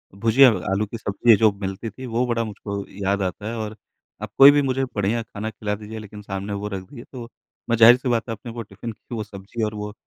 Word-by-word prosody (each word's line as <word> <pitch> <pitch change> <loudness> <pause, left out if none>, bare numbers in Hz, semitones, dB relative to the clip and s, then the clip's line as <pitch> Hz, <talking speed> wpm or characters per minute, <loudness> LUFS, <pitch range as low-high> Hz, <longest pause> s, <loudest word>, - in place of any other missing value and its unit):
भुजिया 115 +6 +6 0.2
आलू 100 +2 +1
की 110 +3 -7
सब्ज़ी 110 +2 +2
है - - +9
जो 110 0 +4
मिलती 95 +3 -4
थी 130 +4 -10
वो 120 +1 0
बड़ा 115 -1 0
मुझको 100 -2 -6 0.2
याद 100 +1 +1
आता 95 +2 -3
है। 115 - -4
और 110 -1 -4 0.5
आप 110 -1 -6
कोई 135 +1 +10
भी 145 0 +3
मुझे 135 -1 0
बढ़िया 105 +3 0
खाना 110 -1 -6
खिला 105 -1 -3
दीजिए 110 +1 -8
लेकिन 105 -1 -10
सामने 100 0 -5
वो 100 +1 -4
रख 100 -2 -4
दीजिए 120 -3 -11
तो 120 -3 -8 0.4
मैं 115 - +2
ज़ाहिर 115 +2 +8
सी 130 0 -3
बात 120 0 0
है 115 - -2
अपने 115 - -9
वो 115 0 -6
टिफिन 105 +2 -8
की 115 +2 -10
वो 110 - -3
सब्ज़ी 105 +2 -6
और 105 0 -1
वो 105 0 -5
110 Hz, 250 wpm, -23 LUFS, 100-115 Hz, 0.5 s, कोई